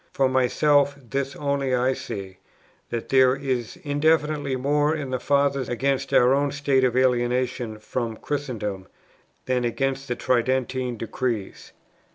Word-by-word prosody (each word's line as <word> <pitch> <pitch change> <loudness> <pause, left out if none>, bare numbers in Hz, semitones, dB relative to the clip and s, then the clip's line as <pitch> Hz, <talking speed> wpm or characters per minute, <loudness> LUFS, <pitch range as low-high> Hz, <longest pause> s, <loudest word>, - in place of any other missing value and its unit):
For 135 - +3
myself, 140 +3 +3
this 135 +2 -4
only 140 -2 0
I 125 +1 +2
see, 100 -8 -7 0.5
that 115 -1 -4
there 130 -1 +5
is 130 -1 -3
indefinitely 150 -1 +1
more 145 +4 +1
in 140 -4 -5
the 130 - -1
Fathers 140 -2 +1
against 135 +2 -1
our 125 +1 +5
own 140 +1 +2
state 140 -2 +1
of 125 -1 +2
alienation 125 -2 +1
from 115 +1 -4
Christendom 110 -10 -4 0.6
than 125 -1 0
against 135 +3 -1
the 125 - -2
Tridentine 125 0 0
Decrees. 115 -2 -4
130 Hz, 135 wpm, -24 LUFS, 120-140 Hz, 0.6 s, there